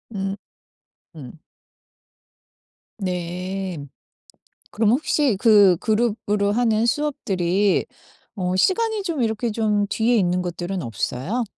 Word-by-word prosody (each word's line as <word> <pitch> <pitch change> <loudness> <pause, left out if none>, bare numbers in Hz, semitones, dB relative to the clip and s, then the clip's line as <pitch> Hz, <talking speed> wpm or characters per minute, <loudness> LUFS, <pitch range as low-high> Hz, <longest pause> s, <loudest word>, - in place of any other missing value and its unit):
음 195 0 -2 0.8
음. 150 0 -11 1.6
네. 180 0 -4 1.0
그럼 215 -1 +2
혹시 275 -2 +1
그 205 -4 +6
그룹으로 210 -1 0
하는 225 -1 +2
수업들이 200 -9 0 0.5
어 185 -2 -2
시간이 435 - +1
좀 330 -8 -2
이렇게 225 +1 -1
좀 210 -2 +1
뒤에 230 +4 +1
있는 180 -3 +1
것들은 175 +1 -4
없어요? 130 - -3
205 Hz, 190 characters per minute, -22 LUFS, 180-230 Hz, 1.6 s, 그